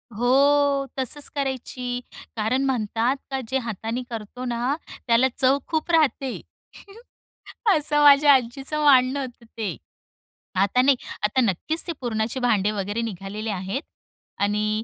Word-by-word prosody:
हो, 275 +3 +3
तसच 280 +3 -3
करायची; 255 -2 -3 0.4
कारण 230 +5 0
म्हणतात 240 0 0
का, 270 - -1
जे 265 - 0
हाताने 230 +1 -4
करतो 230 +2 -6
ना 245 +3 -1 0.3
त्याला 235 +2 +4
चव 265 +1 +4
खूप 320 +1 -1
राहते 285 -5 +2 1.4
असं 295 0 +1
माझ्या 285 0 +8
आजीचं 270 +4 -1
मानणं 265 -1 +5
होतं 245 -3 -7
ते. 220 -3 -3 0.8
आता 200 +6 +3
नाही, 275 +1 +5 0.3
आता 210 +5 +2
नक्कीच 255 - -1
ते - - -1
पुरणाचे 230 +1 -2
भांडं 215 -5 +2
वगैरे 205 +3 -2
निघालेले 210 0 -5
आहेत. 195 +6 -3 0.6
आणि 210 +1 0
250 Hz, 125 wpm, -24 LUFS, 220-275 Hz, 1.4 s, माझ्या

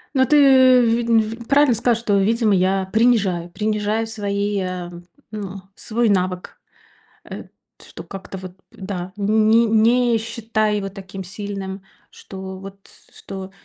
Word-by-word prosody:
Но 260 -1 +4
ты, 295 +3 +3 0.4
ви 235 0 +1
ви 225 -1 +1
правильно 275 +3 +2
сказал, 235 +1 +1
что, 215 -3 0
видимо, 220 +1 +2
я 190 0 +1
принижаю 205 -7 +2
принижаю 215 +2 -1
свои, 205 -1 -2
ам, 180 -2 -6 0.3
ну, 195 -2 -6
свой 235 0 -1
навык, 185 -2 -1 0.7
э, - - -8 0.4
что - - -11
как-то 195 0 -9
вот 185 -1 -9
п - - -36 0.2
да, 190 -2 -6
ни 220 +3 +3
не 230 +2 +3
считаю 220 -1 -1
его 195 -1 -3
таким 195 -1 -9
сильным, 195 0 -6 0.3
что 190 -1 -9
вот 195 0 -10
с - - -21
что 190 -1 -8
205 Hz, 140 wpm, -20 LUFS, 190-225 Hz, 0.7 s, Но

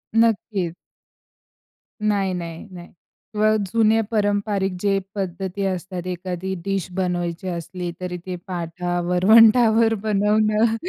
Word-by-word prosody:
नक्कीच. 215 -6 +1 1.3
नाही, 200 -3 +1
नाही, 170 -2 -6
नाही. 175 -1 -10 0.5
किंवा 215 +1 +3
जुने 225 +2 +3
पारंपारिक 205 -2 0
जे 200 0 +1 0.2
पद्धती 190 0 -3
असतात, 185 -1 -4
एखादी 180 +1 -4
डिश 195 -3 -1
बनवायची 175 -1 -2
असली 175 0 -4
तरी 180 -1 -4
ते 185 -1 -4
पाटा-वरवंटावर 185 +7 +4
बनवणं. 215 +1 +2
190 Hz, 100 wpm, -22 LUFS, 180-215 Hz, 1.3 s, पाटा-वरवंटावर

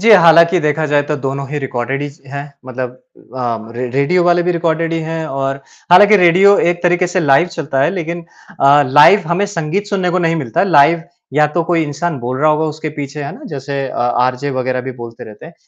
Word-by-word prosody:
जी, 225 +3 +3
हालाँकि 170 -2 +6
देखा 150 +1 -1
जाए 145 -1 +1
तो 150 - 0
दोनों 135 +1 -4
ही 150 +1 -4
रिकॉर्डेड 135 0 -4
ही 145 - -4
स 140 - -22
हैं 140 +1 -6 0.2
मतलब 130 -1 -5 0.5
अ, 115 -3 -4
रे 125 +1 -4
रेडियो 140 +8 +1
वाले 175 0 +3
भी 180 +1 0
रिकॉर्डेड 165 -1 -1
ही 165 - -1
हैं 160 -1 -4
और 135 -1 -3 0.3
हालाँकि 205 +4 +7
रेडियो 190 +2 +5
एक 175 0 0
तरीक़े 175 0 +2
से 180 +1 -1
लाइव 145 +2 +3
चलता 150 -5 -3
है, 145 - +2
लेक़िन 170 -1 -5 0.4
अ, 140 +1 +5
लाइव 150 +10 +5
हमें 185 +4 0
संगीत 195 +1 -3
सुनने 190 -3 -1
को 185 - 0
नहीं 165 -2 0
मिलता 130 -8 -2
है, 195 - +1
लाइव 165 +2 +4 0.3
या 150 +2 +3
तो 170 - +1
कोई 170 -1 0
इंसान 155 +1 -4
बोल 125 +2 -4
रहा 155 +1 +3
होगा 155 +1 0
उसके 155 0 -5
पीछे, 145 +1 -6
है 140 - -6
ना? - - -14
जैसे 140 -1 -5
अ, - - -9
आरजे 125 +3 -1
वग़ैरह 130 -1 -2
भी 130 +1 -7
बोलते 115 -1 -10
रहते 105 +7 -13
हैं 165 - -15
150 Hz, 225 wpm, -15 LUFS, 135-175 Hz, 0.5 s, हालाँकि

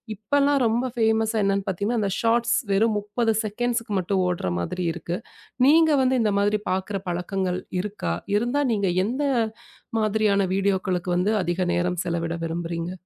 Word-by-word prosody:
இப்பலாம் 280 +7 +2
ரொம்ப 230 +3 +1
ஃபேமஸ் 220 -1 +2
என்னன்னு 195 -1 +1
பார்த்தீங்கன்னா, 205 +5 -1
அந்த 200 - 0
ஷார்ட்ஸ் 235 +1 +2 0.2
வெறும் 215 +3 +3
30 220 +2 0
செகண்ட்ஸ் 235 +2 -1 0.2
மட்டும் 185 +1 0
ஓடுற 175 - -1
மாதிரி 180 - -3
இருக்கு. 170 +1 -4 0.5
நீங்க 320 +2 +6
வந்து 260 0 +2
இந்த 210 -2 +1
மாதிரி 205 +1 +2
பாக்குற 190 +2 -2
பழக்கங்கள் 180 +1 -2 0.2
இருக்கா? 195 - -3 0.2
இருந்தா 245 +7 +1
நீங்க 200 -3 +1 0.2
எந்த 255 +7 -2 0.8
மாதிரியான 215 -2 +2
வீடியோகளுக்கு 190 -2 0
வந்து 195 +5 +1
அதிக 175 +2 -1
நேரம் 180 0 0
செலவிட 170 -1 -2
விரும்புறீங்க? 165 +1 -3
200 Hz, 140 wpm, -24 LUFS, 180-225 Hz, 0.8 s, நீங்க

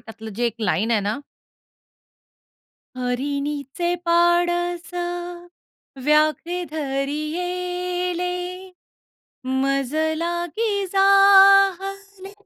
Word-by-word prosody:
त्यातलं 220 0 -10
जे 240 +2 0
एक 230 - -3
लाईन 210 +2 0
आहे 225 -3 +2
ना 205 +4 -2 1.8
हरिणीचे 280 +5 -2
पाडस 345 0 +1 1.1
व्याघ्रे 310 +4 +1
धरियेले, 355 +5 -3 1.2
मजलागी 315 - -1
जाहले 390 0 +4
345 Hz, 60 wpm, -22 LUFS, 275-360 Hz, 1.8 s, जाहले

